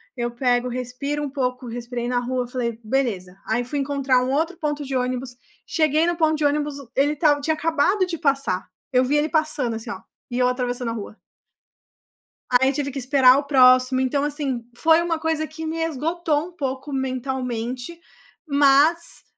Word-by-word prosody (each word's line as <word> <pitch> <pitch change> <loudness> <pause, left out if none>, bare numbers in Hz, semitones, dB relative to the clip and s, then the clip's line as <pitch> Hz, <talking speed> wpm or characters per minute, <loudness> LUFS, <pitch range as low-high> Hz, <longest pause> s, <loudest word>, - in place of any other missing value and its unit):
Eu 240 -1 -2
pego, 245 0 +1
respiro 255 +4 -3
um 290 - -3
pouco. 255 -2 -3
Respirei 240 +1 -5
na 245 - +1
rua. 250 0 -2
Falei: 240 -2 -3
“Beleza.” 215 -7 -1
Aí 235 +2 0
fui 285 +4 -3
encontrar 275 -2 +1
um 255 - -1
outro 325 +5 0
ponto 295 -1 -2
de 270 -1 -4
ônibus. 250 0 -2 0.3
Cheguei 310 0 +2
no 345 0 0
ponto 315 -1 +3
de 300 -1 -1
ônibus. 290 0 0 0.2
Ele 285 +2 +3
estava 295 -1 +3
tinha 315 +3 0
acabado 330 +5 +1
de 350 -2 -4
passar. 275 - 0 0.2
Eu 255 -1 +4
vi 285 +4 +1
ele 295 +1 +2
passando, 305 -7 0
assim, 225 - -7
ó. 190 - -6 0.3
E 245 - -3
eu 250 - +4
atravessando 245 -1 -2
a - - -3
rua. 215 0 -7 1.3
Aí, 265 +2 +4
tive 280 0 -2
que 275 - -6
esperar 260 0 +5
o 285 - -2
próximo. 255 -1 +5
Então, 265 +2 0
assim, 285 -5 -3
foi 320 +4 +4
uma 335 -2 -1
coisa 320 -1 -1
que 320 +1 -7
me 325 +1 -2
esgotou 325 +1 -1
um - - -15
pouco 275 -3 -4
mentalmente. 255 +1 -3 0.5
Mas, 290 +4 +3
270 Hz, 180 wpm, -23 LUFS, 250-300 Hz, 1.3 s, esperar